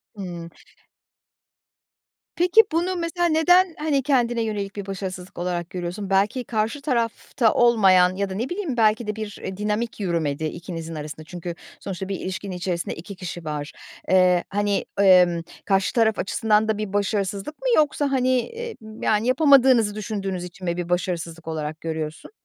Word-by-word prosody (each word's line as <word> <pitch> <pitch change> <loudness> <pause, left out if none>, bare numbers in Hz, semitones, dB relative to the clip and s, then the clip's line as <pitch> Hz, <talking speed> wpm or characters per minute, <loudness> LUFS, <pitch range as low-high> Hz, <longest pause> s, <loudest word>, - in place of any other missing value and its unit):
Hımm. 175 -4 -7 1.9
Peki 360 +6 +6
bunu 345 +3 0
mesela 345 0 -1
neden, 345 +2 +4
hani, 295 -3 0
kendine 240 -4 +2
yönelik 205 -3 -3
bir 200 -2 -5
başarısızlık 190 -2 -6
olarak 175 -1 -2
görüyorsun? 180 +2 -5
Belki 205 +6 +2
karşı 225 +5 -2
tarafta 235 -3 0
olmayan 190 -6 +5
ya 200 0 -1
da - - -4
ne 235 +6 -2
bileyim 355 -9 -3
belki 220 0 +3
de 210 - -2
bir, 215 -2 -6
eee, 190 -1 -5
dinamik 210 +2 -2
yürümedi 160 -6 -1
ikinizin 165 0 -6
arasında 155 +1 -7
çünkü 175 +1 -7 0.2
sonuçta 190 0 -5
bir 195 - -3
ilişkinin 190 0 -5
içerisinde 175 -1 -3
2 185 +5 -9
kişi 175 -2 -7
var. 150 -1 -4 0.4
Eee, 180 -1 +4
hani, 205 0 0 0.2
emm, 180 -3 +6 0.2
karşı 195 -1 +1
taraf 220 -2 +2
açısından 215 +2 +2
da 220 -1 0
bir 210 -2 -4
başarısızlık 200 +5 -1
mı? - - -2
Yoksa, 290 -2 +2
hani, 255 -1 +2
emm, 450 - -8
yani, 215 +2 +2
yapamadığınızı 260 -6 +5
düşündüğünüz 195 -4 -3
için 180 +1 -9
mi 170 0 -1
bir 175 -1 -4
başarısızlık 170 -2 -2
olarak 155 -1 -4
görüyorsun? 160 - -5
200 Hz, 155 wpm, -23 LUFS, 180-235 Hz, 1.9 s, Peki